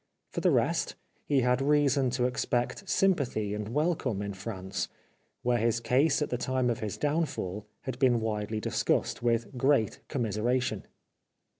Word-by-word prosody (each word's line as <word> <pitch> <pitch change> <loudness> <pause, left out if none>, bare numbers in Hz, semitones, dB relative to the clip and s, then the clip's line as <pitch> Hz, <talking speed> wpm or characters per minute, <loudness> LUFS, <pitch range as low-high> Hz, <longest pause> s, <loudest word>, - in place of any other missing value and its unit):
For - - -3
the - - +4
rest, - - +1 0.3
he 140 -2 +3
had 125 +1 +2
reason 140 -2 +3
to 125 - +2
expect 125 +8 -1
sympathy 130 - +1
and 105 0 -4
welcome 140 - 0
in 100 0 -4
France, 95 -1 -4 0.6
where 120 -1 +2
his 115 +1 +2
case 130 +7 +2
at - - -5
the 125 - -1
time 130 -1 +1
of 115 - -3
his 105 -2 -4
downfall 145 - -1
had 130 -1 -5
been 125 -3 +4
widely 110 -1 -2
discussed, 110 - 0
with 120 +2 0
general 125 -4 +3 0.2
commiseration. 120 +1 -1
125 Hz, 150 wpm, -29 LUFS, 110-135 Hz, 0.6 s, the